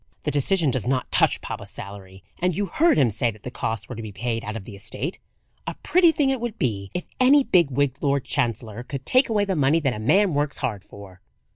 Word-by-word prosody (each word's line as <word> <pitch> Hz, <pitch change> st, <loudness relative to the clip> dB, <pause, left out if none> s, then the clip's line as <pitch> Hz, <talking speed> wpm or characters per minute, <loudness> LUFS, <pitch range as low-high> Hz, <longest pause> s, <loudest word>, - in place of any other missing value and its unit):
"The 150 Hz, -, -1 dB
decision 150 Hz, +2 st, +2 dB
does 125 Hz, -2 st, -2 dB
not 130 Hz, 0 st, -1 dB
touch -, -, +3 dB
papa's -, -, -6 dB
salary; 95 Hz, -1 st, -9 dB, 0.2 s
and 180 Hz, -2 st, 0 dB
you 205 Hz, -, 0 dB
heard 320 Hz, -, +3 dB
him 130 Hz, -6 st, +4 dB
say 120 Hz, +4 st, 0 dB
that 110 Hz, -2 st, -10 dB
the 125 Hz, -, -6 dB
costs 110 Hz, -3 st, -3 dB
were -, -, -7 dB
to 115 Hz, -, -6 dB
be 110 Hz, -2 st, -7 dB
paid 115 Hz, +2 st, -3 dB
out 110 Hz, -1 st, -5 dB
of 105 Hz, -4 st, -6 dB
the 105 Hz, -, -9 dB
estate. 120 Hz, -, -4 dB, 0.5 s
A -, -, -3 dB
pretty 350 Hz, -1 st, +5 dB
thing 285 Hz, -4 st, +1 dB
it 265 Hz, -3 st, -2 dB
would 240 Hz, -3 st, -4 dB
be 100 Hz, -6 st, -2 dB
if 180 Hz, -, -3 dB
any 270 Hz, +3 st, +6 dB
big 175 Hz, -, +3 dB
wigged 140 Hz, 0 st, 0 dB
Lord 140 Hz, -2 st, +1 dB
Chancellor 115 Hz, -4 st, -2 dB
could 135 Hz, +1 st, -7 dB
take 255 Hz, 0 st, +3 dB
away 210 Hz, -2 st, +2 dB
the 195 Hz, -2 st, -1 dB
money 145 Hz, +2 st, +3 dB
that 135 Hz, -4 st, +1 dB
a 105 Hz, -, -6 dB
man 170 Hz, -, +3 dB
works 145 Hz, 0 st, -1 dB
hard 105 Hz, -5 st, -3 dB
for!" 100 Hz, -3 st, -13 dB
135 Hz, 240 wpm, -24 LUFS, 110-180 Hz, 0.5 s, any